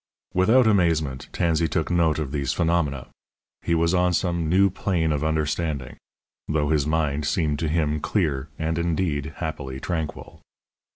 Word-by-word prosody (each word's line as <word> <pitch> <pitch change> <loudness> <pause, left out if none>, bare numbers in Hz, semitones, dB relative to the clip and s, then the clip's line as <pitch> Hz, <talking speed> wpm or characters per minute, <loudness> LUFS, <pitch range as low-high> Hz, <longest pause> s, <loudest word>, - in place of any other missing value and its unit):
Without 115 +8 +4
amazement 80 -10 +1
Tansey 85 -1 +1
took 80 0 -1
note 85 -3 +2
of 75 -4 -3
these 70 -2 -1
phenomena. 80 -6 0 0.5
He 85 - 0
was 85 +1 +2
on 90 0 +2
some 85 -3 0
new 95 +2 +4
plane 85 -4 0
of 75 0 -1
understanding, 75 -3 -1 0.5
though 75 -2 0
his 75 -2 +2
mind 75 -2 0
seemed 75 -2 0
to 80 - -1
him 75 -1 0
clear 75 -6 -1
and, 80 +1 -1
indeed, 80 -3 -1
happily 70 -5 -5
tranquil. 80 -1 -5
80 Hz, 150 wpm, -24 LUFS, 75-85 Hz, 0.5 s, Without